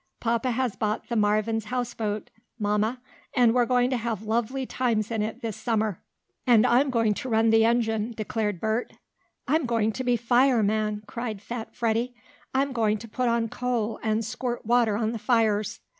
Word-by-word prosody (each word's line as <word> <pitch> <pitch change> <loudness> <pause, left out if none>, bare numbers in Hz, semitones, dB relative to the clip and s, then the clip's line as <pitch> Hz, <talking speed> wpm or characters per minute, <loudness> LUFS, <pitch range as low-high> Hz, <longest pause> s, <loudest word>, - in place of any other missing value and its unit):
"Papa 235 +2 0
has 245 -2 -1
bought 215 -1 -2
the 235 - -1
Marvin's 215 +1 +1
houseboat, 230 -3 -3 0.3
Mamma, 210 +3 0 0.4
and 240 -3 +5
we're 245 -1 +3
going 250 0 +2
to 255 - +1
have 225 -3 -3
lovely 235 +4 -1
times 230 -4 -1
in 225 -2 0
it 215 +2 -4
this 225 -3 -3
summer." 220 -5 -1 0.5
"And 230 -3 +6
I'm 260 +4 +4
going 230 -4 +2
to 255 - -5
run 225 0 +3
the 225 0 +5
engine," 225 -1 +1
declared 210 -3 -2
Bert. 220 +4 -1 0.5
"I'm 300 -1 +2
going 225 -2 +1
to 255 +4 -4
be 245 -1 +2
fireman!" 220 -4 +2
cried 220 -1 -5
fat 230 +2 -7
Freddie. 235 +1 0 0.4
"I'm 270 +1 0
going 215 -3 +1
to 225 +2 -10
put 245 +2 -1
on 235 -1 +1
coal 235 -2 -2
and 220 0 0
squirt 240 +2 -4
water 230 -2 +3
on 220 0 0
the 230 - -4
fires!" 215 -3 +1
230 Hz, 175 wpm, -26 LUFS, 215-245 Hz, 0.5 s, And